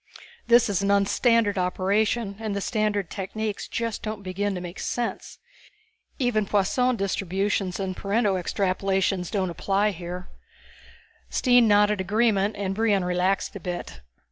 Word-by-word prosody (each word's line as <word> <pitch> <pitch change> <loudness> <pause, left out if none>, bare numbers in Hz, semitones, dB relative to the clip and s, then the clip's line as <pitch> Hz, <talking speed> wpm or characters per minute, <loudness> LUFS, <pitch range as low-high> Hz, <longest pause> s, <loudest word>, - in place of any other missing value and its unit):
"This 240 0 +6
is 200 -3 0
an 200 - 0
un 200 0 +4
standard 230 -3 +2
operation, 200 +3 0
and 215 -2 -3
the - - -1
standard 205 -3 -1
techniques 210 +1 -4
just 230 -2 -3
don't 215 -2 -5
begin 195 +2 -2
to - - -3
make 175 +1 -8
sense. 240 -1 -3 0.8
Even 235 -6 +1
Poisson 245 +6 +2
Distributions 195 -1 -1
and 190 -1 -3
Pareto 205 +1 +1
Extrapolations 190 0 0
don't 190 -4 -1
apply 195 +4 +1
here." 180 0 -7 1.0
Stine 245 -3 +4
nodded 205 -1 +4
agreement 210 +1 +1
and 195 -1 -2
Brion 205 -3 +1
relaxed 180 +3 0
a - - -5
bit. 175 - -6
200 Hz, 140 wpm, -25 LUFS, 190-215 Hz, 1.0 s, This